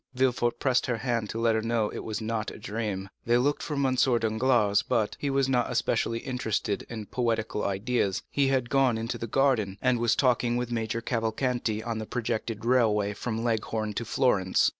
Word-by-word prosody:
Villefort 125 -2 +1
pressed 130 -1 +2
her 120 -3 0
hand 115 -4 -1
to - - -4
let 115 -1 +3
her 110 - +1
know 115 -1 0
it - - -5
was 110 -1 -3
not 110 -1 -2
a - - -10
dream. 105 -2 -4 0.2
They 120 +1 +4
looked 145 +4 +1
for 150 - -3
M. 135 -2 +1
Danglars, 115 -3 +2
but, 115 -4 0
as - - -12
he 145 - -1
was 135 -1 +2
not 125 -2 +1
especially 115 - 0
interested 110 -5 -2
in 110 -3 -6
poetical 115 -2 -1
ideas, 100 0 0
he 140 -1 +2
had 130 -3 0
gone 135 -4 +3
into 115 +1 -3
the 115 - -4
garden, 115 -6 +1
and 125 -2 +2
was 120 -1 +2
talking 120 -2 +2
with 120 -1 -3
Major 115 0 -2
Cavalcanti 115 -1 -1
on 115 -2 -3
the 110 - -5
projected 115 -2 -3
railway 110 -5 +3
from 115 +2 -3
Leghorn 110 -2 -1
to 110 - -3
Florence. 100 -5 +2
115 Hz, 195 wpm, -28 LUFS, 110-125 Hz, 0.2 s, They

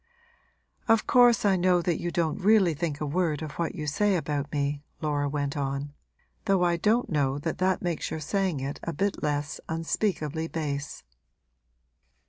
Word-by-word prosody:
'Of 225 -1 +4
course 245 -3 +5
I 195 -2 +4
know 180 0 +3
that 170 -1 0
you 175 - -1
don't 165 -3 -1
really 200 -4 +5
think 155 -1 -3
a - - 0
word 160 0 0
of 155 - -5
what 170 - -1
you 150 - -4
say 200 +7 +2
about 145 -4 -2
me,' 145 0 -1 0.2
Laura 145 -2 0
went 145 -1 -2
on; 140 0 -3 0.5
'though 195 -2 +3
I 175 -1 +3
don't 215 +7 +1
know 140 -3 +1
that 160 +2 -3
that 185 +1 +1
makes 175 -3 -2
your 160 - -4
saying 185 -2 -1
it 140 +2 -4
a 170 - -4
bit 200 +6 -1
less 145 -1 -2
unspeakably 160 -1 -1
base.' 145 - -4
160 Hz, 170 wpm, -27 LUFS, 145-185 Hz, 0.5 s, course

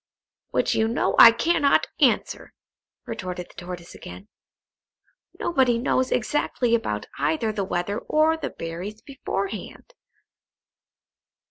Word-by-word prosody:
"Which - - 0
you 220 - +2
know 230 - 0
I 230 - +11
cannot 285 +4 +2
answer," - - +1 0.5
retorted 180 -5 -6
the - - -18
Tortoise 175 -1 -8
again. 190 +3 -11 1.1
"Nobody 260 -7 +2
knows 255 +1 0
exactly 245 0 0
about 105 - -1
either 160 +10 0
the 205 -2 -2
weather 185 +2 -2
or 310 +1 +2
the 320 - -5
berries 175 +6 -7
beforehand." 215 - -6
220 Hz, 110 wpm, -24 LUFS, 180-255 Hz, 1.1 s, I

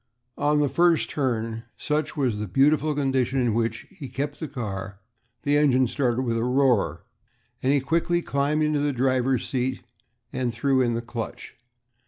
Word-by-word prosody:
On 150 +1 +3
the 145 - +3
first 170 +4 +2
turn, 115 -5 -1 0.2
such 150 0 -2
was 125 -7 0
the 105 - -3
beautiful 150 - +3
condition 135 -2 +1
in 120 -3 +1
which 115 0 -1
he 160 -10 -9
kept 145 +1 -4
the 160 - -4
car, 100 -7 -5 0.4
the 145 0 +2
engine 135 -3 +4
started 125 0 0
with 115 -2 0
a - - 0
roar, 125 - +2 0.6
and 130 - +2
he 145 - +4
quickly 170 +5 0
climbed 145 +2 0
into 150 -1 +1
the 145 0 0
driver's 130 0 +1
seat 130 0 -2 0.5
and 125 -2 -1
threw 130 +3 +1
in 120 -2 +1
the 115 - -3
clutch. 115 -1 -6
130 Hz, 170 wpm, -25 LUFS, 120-145 Hz, 0.6 s, engine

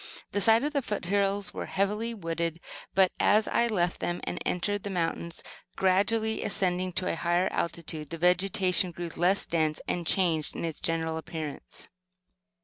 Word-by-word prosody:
The 205 - 0
sides 225 +5 +6
of 300 - -2
the 280 - +1
foot 210 -6 -3
hills 200 +1 0
were - - -5
heavily 210 +4 -1
wooded, 165 -3 -3 0.4
but, 190 -1 +5
as 215 +1 +4
I 235 - +2
left 180 -6 0
them 175 0 -2
and - - -3
entered 205 +3 -1
the 205 - -5
mountains, 170 -2 -2 0.3
gradually 215 +4 +2
ascending 185 -2 +1
to 180 - -1
a - - 0
higher 175 +2 +1
altitude, 160 -3 -3
the 165 - -5
vegetation 180 +1 +3
grew 170 -1 -6
less 180 +4 +3
dense 155 -2 0
and 170 -2 -2
changed 170 -6 +1
in - - -3
its 165 -2 -4
general 160 -1 -1
appearance. 160 -2 -6
180 Hz, 165 wpm, -28 LUFS, 170-200 Hz, 0.4 s, sides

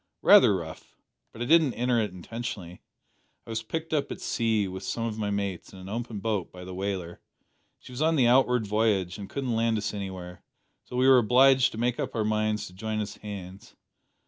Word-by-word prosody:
"Rather 100 - +7
rough; 80 -3 -8 0.4
but 120 - -6
I - - -2
didn't 155 -2 +4
enter 120 -1 +1
it 105 - -1
intentionally. 90 -1 -7 0.6
I - - -9
was 110 0 -2
picked 160 +9 -5
up 150 -2 0
at - - -6
sea, 110 -4 0
with 95 0 -7
some 115 +4 -3
of 110 -1 -4
my 105 -1 -1
mates, 100 -3 -3
in - - -11
an 95 +1 -10
open 115 0 -4
boat, 105 -3 -2
by 90 0 -10
the 90 0 -8
whaler. 95 -2 -4 0.6
She - - -15
was 125 +3 -6
on 160 +1 +3
the 130 -5 +4
outward 125 -1 +4
voyage, 100 -3 0
and 100 - -8
couldn't 130 -4 -2
land 115 0 +1
us 105 0 -3
anywhere, 95 -3 -7 0.4
so - - -9
we 130 +1 +3
were 130 -1 +8
obliged 130 +3 +5
to - - -7
make 120 +1 0
up - - -3
our 110 -2 0
minds 110 0 0
to 90 - -11
join 110 +3 -3
as 105 -1 -5
hands." 100 -2 -9
110 Hz, 210 wpm, -27 LUFS, 95-120 Hz, 0.6 s, were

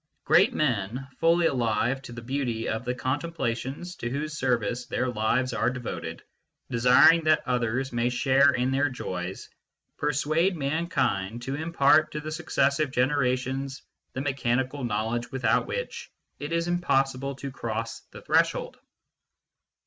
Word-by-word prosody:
Great 195 +8 +5
men, 125 - -1
fully 170 +1 +4
alive 125 -2 +1
to 125 - -10
the 120 0 -8
beauty 120 -3 -2
of 110 +2 -2
the 125 +1 -1
contemplations 145 +3 -3
to 120 - -4
whose 150 +4 -3
service 125 -1 0
their 130 - -1
lives 120 +3 0
are 115 - +1
devoted, 125 -2 -6 0.5
desiring 125 +8 +6
that 155 0 +3
others 125 +1 -1
may 120 +1 +1
share 135 +3 +4
in 125 +1 +1
their 140 +2 +2
joys, 95 -7 -5 0.5
persuade 155 +5 +1
mankind 130 - -1
to 135 - -3
impart 155 0 +3
to 150 - -4
the 155 +1 -6
successive 155 -3 +1
generations 130 +1 0 0.3
the 130 - -3
mechanical 130 0 -1
knowledge 115 +2 -2
with 130 -1 -4
out - - +3
which - - -5 0.3
it 145 +2 -5
is 170 0 0
impossible 135 -6 0
to 140 +1 -6
cross 115 -3 -4
the - - -12
threshold. - - +1
130 Hz, 140 wpm, -27 LUFS, 120-150 Hz, 0.5 s, desiring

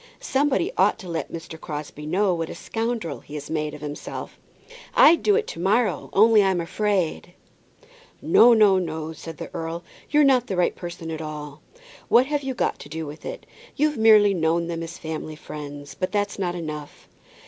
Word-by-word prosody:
Somebody 290 +7 +1
ought - - +4
to 190 - -10
let 165 -2 -4
Mr. 165 -1 -8
Crosbie 150 -1 -6
know 190 +3 +2
what 165 -1 -3
a - - -7
scoundrel 225 -9 -3
he 145 - -11
has 150 - -7
made 155 -1 -2
himself." 150 0 -7 0.6
"I'd 330 +2 +7
do 415 - +3
it 445 0 +1
to - - -7
morrow, 195 -1 +1
only 220 +1 +6
I'm 190 -2 +2
afraid 180 -1 -1 0.5
" - - -25 0.2
"No, 240 - +6
no, 205 -4 +5
no," 160 -2 -4
said 160 0 -9
the - - -8
earl; 165 0 -4 0.3
"you 300 0 +4
are - - +6
not 260 -3 +4
the 190 - -3
right 180 - +2
person 170 -2 -7
at 160 0 -5
all. 150 -1 -7 0.5
What 245 +2 +5
have 290 +1 -1
you 265 -2 -4
got - - -1
to - - -11
do 160 +1 -4
with 150 +1 -9
it? - - -7 0.3
You've 300 0 +1
merely 215 -2 +6
known 170 -1 +1
them 165 0 -4
as 165 0 -7
family 155 -1 -5
friends, 145 -2 -8
but 185 +6 -3
that's 205 -1 -1
not 180 -2 -1
enough." 155 -3 -7
175 Hz, 190 wpm, -24 LUFS, 155-220 Hz, 0.6 s, I'd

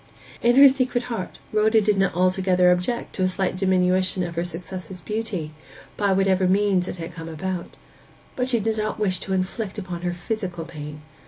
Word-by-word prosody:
In 240 +1 +4
her 280 +1 +10
secret 255 -2 +1
heart 185 -6 -5 0.2
Rhoda 215 +1 +4
did 210 0 +2
not 195 -3 +1
altogether 185 0 +3
object 180 +7 -1
to - - -3
a 185 - +4
slight 185 0 -1
diminution 185 0 +2
of 170 -1 -4
her 170 +1 -1
successor's 180 +1 -7
beauty, 190 -3 -3 0.4
by 200 -2 +1
whatever 190 -1 +3
means 190 -1 +2
it - - -4
had 165 -1 -7
come 165 -1 -7
about; 175 +2 -5 0.6
but 250 0 -1
she 240 -2 +3
did 220 +1 -1
not 215 0 -2
wish 190 -3 +1
to 190 - -4
inflict 190 +3 -2
upon 180 -4 -5
her 175 0 -1
physical 175 -2 -4
pain. 150 -2 -8
185 Hz, 185 wpm, -24 LUFS, 180-210 Hz, 0.6 s, her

